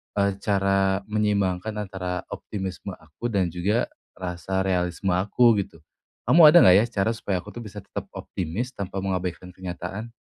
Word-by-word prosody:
eee, 100 -1 +2
cara 95 -1 +1
menyeimbangkan 105 -1 0
antara 95 -3 -4
optimisme 95 -1 -5
aku 80 +8 -7
dan 95 -7 0
juga 95 +7 0 0.2
rasa 95 +1 -3
realisme 90 0 0
aku, 105 +5 +3
gitu. 80 -5 -6 0.4
Kamu 155 +6 +8
ada 170 +3 +8
nggak, 90 - +8
ya, 110 - +3 0.2
cara 110 - +1
supaya 100 -5 -3
aku, - - -10
tuh, - - -8
bisa 105 -1 -9
tetap 100 - -7
optimis 95 +9 -4
tanpa 100 -4 -5
mengabaikan 90 -2 -3
kenyataan? 95 +5 -6
95 Hz, 150 wpm, -25 LUFS, 90-105 Hz, 0.4 s, Kamu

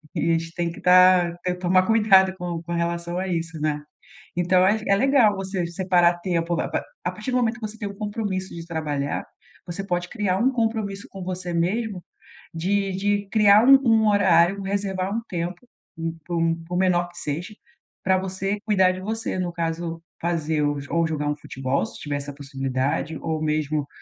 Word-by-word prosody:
e 165 - 0
a - - +4
gente 165 0 -2
tem 170 -1 -2
que - - -12
estar 180 -1 +5
te 180 0 0
tomar 185 +1 +2
cuidado 195 -4 +5
com 175 -2 -4
com 170 +1 -5
relação 170 +1 -2
a 190 - -2
isso, 165 -3 -3
né. 150 -1 0 0.6
Então 180 +1 +3
ach 215 +3 +2
é - - +2
é - - +5
legal 245 -4 +4
você 190 -2 -2
separar 175 -1 +2
tempo, 170 -2 -1
a - - -2
pa - - -1 0.2
a - - 0
partir 260 - -5
do - - +1
momento 235 -1 +1
que 215 - -3
você 220 +1 -12
tem 205 - -3
o 200 - -9
compromisso 205 -3 -3
de 165 0 -8
trabalhar, 150 -4 -2 0.4
você 180 +3 -5
pode 175 -2 -2
criar 205 -5 -1
um 245 +5 +3
compromisso 220 -4 -2
com 195 -1 -8
você 180 -1 -4
mesmo, 190 +3 -1 0.5
de 195 +4 0
de 205 +1 0
criar 210 +1 +6
um 275 0 +9
um 220 -1 +4
horário, 190 -1 +4
reservar 195 -1 -2
um 230 - -1
tempo, 175 +2 -4 0.3
por 165 0 -3
por 165 -1 +1
por 180 - -2
menor 175 -2 +2
que 175 - -18
seja, 170 +8 -5 0.5
pra 190 0 +4
você 190 +2 -2
cuidar 190 -4 +4
de 185 - -7
você, 220 -1 -3
no 180 -1 -1
caso 165 0 -3 0.2
fazer 160 -3 0
ou 145 0 0
ou 170 -1 +1
jogar 150 -2 -2
um 150 - 0
futebol 130 -4 -2
se - - -10
tiver 145 -1 -3
essa 145 0 -6
possibilidade, 135 +2 -2
ou 160 -1 -2
mesmo 150 -1 -1
180 Hz, 195 wpm, -24 LUFS, 165-200 Hz, 0.6 s, um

